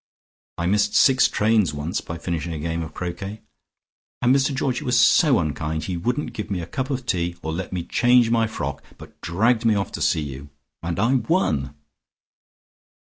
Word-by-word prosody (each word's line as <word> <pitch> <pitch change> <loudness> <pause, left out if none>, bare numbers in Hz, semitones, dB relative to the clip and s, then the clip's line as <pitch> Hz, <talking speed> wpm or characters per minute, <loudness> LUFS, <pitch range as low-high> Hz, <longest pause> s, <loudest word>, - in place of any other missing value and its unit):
I 85 - -2
missed 100 +3 +1
six 135 -1 +5
trains 105 -7 +1
once 75 +7 -3
by 85 - -7
finishing 85 -1 -3
a 80 - -5
game 85 +2 -2
of 80 -2 -6
croquet. 95 +4 -6 0.8
And 125 +2 +5
Mr 135 +1 +2
Georgie 135 -1 -1
was 125 -1 +2
so 140 +1 +5
unkind: 80 0 -2
he 90 - -3
wouldn't 125 - -2
give 105 - -5
me 95 -3 -2
a 85 - -4
cup 130 - -4
of 130 -2 -3
tea, 85 -6 -1
or 80 - -3
let 90 +2 -5
me 90 -2 -3
change 120 +3 +3
my 115 -1 +2
frock, 70 -10 -5
but - - -15
dragged 110 +7 +1
me 115 -2 +3
off 100 -2 -2
to - - -6
see 80 - +2
you. 70 0 -8 0.3
And 85 0 -3
I 115 +7 +2
won!" 80 - 0
95 Hz, 185 wpm, -23 LUFS, 85-120 Hz, 0.8 s, six